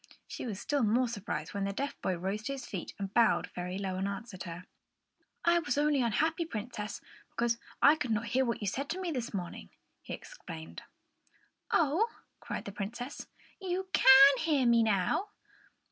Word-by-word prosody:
She -, -, -6 dB
was 205 Hz, -4 st, -4 dB
still 290 Hz, -2 st, 0 dB
more 240 Hz, +3 st, +3 dB
surprised 210 Hz, -4 st, -4 dB
when 200 Hz, -1 st, -1 dB
the 200 Hz, -, -2 dB
deaf 280 Hz, +7 st, -3 dB
boy 185 Hz, -2 st, 0 dB
rose 195 Hz, +4 st, -2 dB
to 275 Hz, -, -1 dB
his 270 Hz, -, -6 dB
feet 185 Hz, -4 st, -6 dB
and 195 Hz, 0 st, -5 dB
bowed 230 Hz, -2 st, +3 dB
very 180 Hz, +1 st, -4 dB
low 190 Hz, -2 st, -3 dB
and 190 Hz, +1 st, -1 dB
answered 200 Hz, -1 st, -6 dB
her. 175 Hz, +1 st, -7 dB, 0.8 s
"I 340 Hz, 0 st, +5 dB
was 280 Hz, -5 st, -2 dB
only 295 Hz, -2 st, +3 dB
unhappy, 315 Hz, +9 st, +1 dB
Princess, 215 Hz, -7 st, -5 dB, 0.3 s
because 235 Hz, 0 st, 0 dB, 0.2 s
I 295 Hz, +2 st, +7 dB
could 255 Hz, -5 st, -3 dB
not 225 Hz, +1 st, 0 dB
hear 260 Hz, +2 st, +2 dB
what 235 Hz, -3 st, -2 dB
you 205 Hz, -, -2 dB
said 275 Hz, +8 st, -2 dB
to 370 Hz, -, -2 dB
me 365 Hz, -3 st, -2 dB
this 250 Hz, -5 st, -3 dB
morning," 180 Hz, -4 st, -5 dB, 0.3 s
he -, -, -5 dB
explained. 165 Hz, -, -9 dB, 0.9 s
"Oh!" 330 Hz, +9 st, +3 dB, 0.3 s
cried -, -, -5 dB
the 200 Hz, -, -5 dB
Princess. 235 Hz, +7 st, -6 dB, 0.3 s
"You 375 Hz, 0 st, -3 dB
can 270 Hz, +1 st, +9 dB
hear 300 Hz, -5 st, +2 dB
me 235 Hz, -1 st, +5 dB
now!" 220 Hz, -, +1 dB
235 Hz, 180 wpm, -31 LUFS, 200-285 Hz, 0.9 s, can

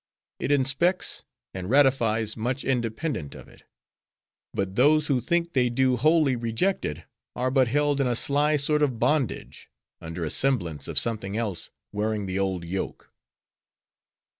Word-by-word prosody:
It -, -, -2 dB
inspects 145 Hz, +7 st, +1 dB, 0.3 s
and 95 Hz, 0 st, -5 dB
ratifies 115 Hz, -5 st, +3 dB
much 125 Hz, +4 st, -2 dB
independent 120 Hz, -, -2 dB
of -, -, -12 dB
it. -, -, -19 dB, 0.9 s
But 95 Hz, -1 st, -3 dB
those 150 Hz, +7 st, +4 dB
who 135 Hz, -5 st, +1 dB
think 170 Hz, +6 st, -1 dB
they 125 Hz, -2 st, +2 dB
do 130 Hz, +1 st, +2 dB
wholly 155 Hz, +1 st, +3 dB
reject 120 Hz, -, -1 dB
it, 75 Hz, +3 st, -5 dB, 0.3 s
are 130 Hz, +1 st, -1 dB
but 130 Hz, -1 st, +3 dB
held 145 Hz, +2 st, +1 dB
in 135 Hz, -, +1 dB
a 120 Hz, -, 0 dB
sly 145 Hz, +5 st, +2 dB
sort 150 Hz, +1 st, +2 dB
of 135 Hz, -5 st, +1 dB
bondage; 145 Hz, -1 st, -1 dB, 0.3 s
under 85 Hz, +1 st, -5 dB
a 75 Hz, -, -1 dB
semblance 85 Hz, -, 0 dB
of -, -, -5 dB
something 110 Hz, -3 st, +1 dB
else, 105 Hz, -7 st, -3 dB, 0.2 s
wearing 105 Hz, 0 st, -2 dB
the 95 Hz, 0 st, -2 dB
old 95 Hz, -3 st, -1 dB
yoke. 95 Hz, +3 st, -5 dB
125 Hz, 150 wpm, -25 LUFS, 105-145 Hz, 0.9 s, those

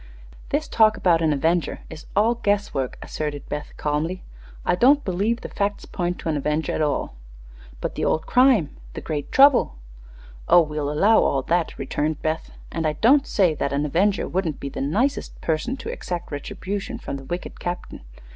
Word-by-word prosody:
"This 300 Hz, +2 st, 0 dB
talk 220 Hz, -1 st, +4 dB
about 170 Hz, -3 st, +3 dB
an 160 Hz, -2 st, +2 dB
avenger 160 Hz, +4 st, 0 dB
is 160 Hz, -1 st, -11 dB
all 215 Hz, +4 st, +4 dB
guess 205 Hz, -3 st, 0 dB
work," 135 Hz, -2 st, -2 dB
asserted 150 Hz, -2 st, -4 dB
Beth, 150 Hz, 0 st, -5 dB
calmly. 155 Hz, +5 st, -2 dB, 0.4 s
"I -, -, +3 dB
don't 275 Hz, +10 st, +4 dB
believe 205 Hz, +6 st, 0 dB
the -, -, -5 dB
facts 205 Hz, 0 st, -2 dB
point 175 Hz, -1 st, -2 dB
to -, -, -4 dB
an 155 Hz, -, 0 dB
avenger 150 Hz, +2 st, -1 dB
at -, -, -1 dB
all." 145 Hz, -, -1 dB, 0.7 s
"But -, -, -2 dB
the -, -, -4 dB
old 160 Hz, -, +1 dB
crime 245 Hz, -, +4 dB, 0.2 s
the -, -, -5 dB
great 145 Hz, -3 st, -4 dB
trouble 270 Hz, -, +5 dB, 0.4 s
" -, -, -19 dB
"Oh, 175 Hz, -, +8 dB
we'll 150 Hz, -2 st, -2 dB
allow 200 Hz, +9 st, +4 dB
all 135 Hz, -1 st, +1 dB
that," 170 Hz, +2 st, 0 dB
returned 150 Hz, +3 st, -2 dB
Beth; 160 Hz, +1 st, -2 dB, 0.2 s
"and 165 Hz, -1 st, -1 dB
I 155 Hz, -, 0 dB
don't 270 Hz, -, +4 dB
say 185 Hz, -6 st, +3 dB
that 140 Hz, -2 st, -2 dB
an 145 Hz, +1 st, 0 dB
avenger 190 Hz, +7 st, +1 dB
wouldn't 175 Hz, -5 st, -2 dB
be 140 Hz, -, -5 dB
the -, -, -5 dB
nicest 220 Hz, -, -1 dB
person 170 Hz, -, -1 dB
to 260 Hz, -, -7 dB
exact 175 Hz, -2 st, -5 dB
retribution 195 Hz, -, -5 dB
from 140 Hz, -11 st, -5 dB
the 135 Hz, -, -10 dB
wicked 175 Hz, +5 st, -5 dB
captain. 175 Hz, 0 st, -5 dB
170 Hz, 185 wpm, -23 LUFS, 150-205 Hz, 0.7 s, Oh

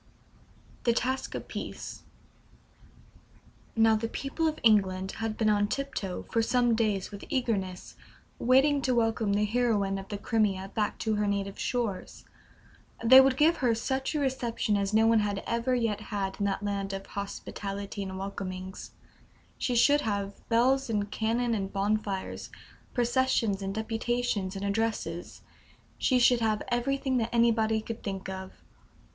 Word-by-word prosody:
THE 235 Hz, -, +4 dB
TASKS 260 Hz, +3 st, -1 dB
OF -, -, -6 dB
PEACE. -, -, -6 dB, 1.7 s
Now, 225 Hz, -1 st, +5 dB
the 225 Hz, +1 st, -1 dB
people 275 Hz, +7 st, -2 dB
of 310 Hz, -, -1 dB
England 190 Hz, -4 st, +3 dB
had 225 Hz, -1 st, -2 dB
been 220 Hz, -, +1 dB
on 205 Hz, 0 st, +2 dB
tiptoe 215 Hz, -8 st, -3 dB
for 230 Hz, -, +2 dB
some 240 Hz, +1 st, +2 dB
days 215 Hz, -4 st, 0 dB
with 200 Hz, -1 st, -8 dB
eagerness, 200 Hz, -8 st, -2 dB, 0.4 s
waiting 275 Hz, +3 st, +4 dB
to 255 Hz, -2 st, +1 dB
welcome 225 Hz, -3 st, +1 dB
the 210 Hz, +1 st, +2 dB
heroine 210 Hz, -4 st, +1 dB
of 195 Hz, -, -9 dB
the 205 Hz, -, -4 dB
Crimea 200 Hz, -3 st, 0 dB
back 210 Hz, -2 st, -1 dB
to 215 Hz, -1 st, +1 dB
her 210 Hz, 0 st, +1 dB
native 200 Hz, -1 st, -2 dB
shores. 235 Hz, -6 st, -3 dB, 0.8 s
They 260 Hz, +3 st, +10 dB
would 265 Hz, -1 st, +3 dB
give 320 Hz, +4 st, +4 dB
her 240 Hz, -4 st, +2 dB
such 265 Hz, +5 st, -2 dB
a -, -, +1 dB
reception 245 Hz, -6 st, 0 dB
as 200 Hz, 0 st, 0 dB
no 220 Hz, +1 st, +4 dB
one 225 Hz, 0 st, +5 dB
had 205 Hz, -1 st, -1 dB
ever 235 Hz, +2 st, 0 dB
yet 225 Hz, -4 st, 0 dB
had 200 Hz, -3 st, -3 dB
in 200 Hz, -, +1 dB
that 200 Hz, +1 st, -1 dB
land 200 Hz, -1 st, -2 dB
of 195 Hz, 0 st, -5 dB
hospitality 200 Hz, 0 st, -5 dB
and 190 Hz, -1 st, -5 dB
welcomings. 190 Hz, -1 st, -6 dB, 0.7 s
She 250 Hz, -, 0 dB
should 290 Hz, +5 st, +5 dB
have 200 Hz, -3 st, -2 dB, 0.2 s
bells 255 Hz, +3 st, +3 dB
and 205 Hz, -2 st, -1 dB
cannon 230 Hz, +2 st, 0 dB
and 195 Hz, -3 st, -2 dB
bonfires, 200 Hz, -1 st, -2 dB, 0.5 s
processions 240 Hz, -4 st, +1 dB
and 195 Hz, 0 st, -3 dB
deputations 225 Hz, -3 st, -1 dB
and 195 Hz, +1 st, -4 dB
addresses 200 Hz, -5 st, -2 dB, 0.6 s
she 255 Hz, -, +3 dB
should 245 Hz, 0 st, +5 dB
have 220 Hz, -2 st, 0 dB
everything 265 Hz, +2 st, 0 dB
that 230 Hz, -1 st, 0 dB
anybody 225 Hz, -2 st, +3 dB
could 230 Hz, +1 st, -6 dB
think 195 Hz, -2 st, -5 dB
of. 190 Hz, 0 st, -6 dB
220 Hz, 150 wpm, -29 LUFS, 200-240 Hz, 1.7 s, They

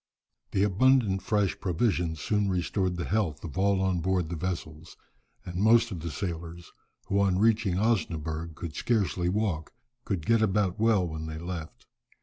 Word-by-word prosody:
The 95 Hz, -, +1 dB
abundant 105 Hz, -1 st, +3 dB
fresh 105 Hz, -2 st, 0 dB
provisions 85 Hz, -4 st, 0 dB
soon 105 Hz, +5 st, 0 dB
restored 90 Hz, 0 st, -1 dB
the 85 Hz, -, -3 dB
health 95 Hz, -9 st, -1 dB
of 85 Hz, -, -7 dB
all 100 Hz, +1 st, +2 dB
on 95 Hz, -2 st, +1 dB
board 90 Hz, -1 st, 0 dB
the 85 Hz, -, -3 dB
vessels, 80 Hz, -2 st, -5 dB, 0.5 s
and 90 Hz, 0 st, -6 dB
most 115 Hz, +3 st, +4 dB
of 90 Hz, -, -4 dB
the 85 Hz, +1 st, -4 dB
sailors, 85 Hz, -1 st, -5 dB, 0.3 s
who 100 Hz, -, +1 dB
on 95 Hz, -2 st, +2 dB
reaching 110 Hz, -2 st, +2 dB
Osnaburgh 85 Hz, -6 st, -1 dB
could 80 Hz, -2 st, -7 dB
scarcely 90 Hz, -7 st, 0 dB
walk, 95 Hz, -5 st, -1 dB, 0.3 s
could 90 Hz, -6 st, -3 dB
get 115 Hz, -1 st, +3 dB
about 100 Hz, -2 st, +1 dB
well 110 Hz, -5 st, +3 dB
when 80 Hz, -1 st, -5 dB
they 80 Hz, 0 st, -5 dB
left. 85 Hz, -1 st, -7 dB
90 Hz, 160 wpm, -28 LUFS, 85-105 Hz, 0.5 s, most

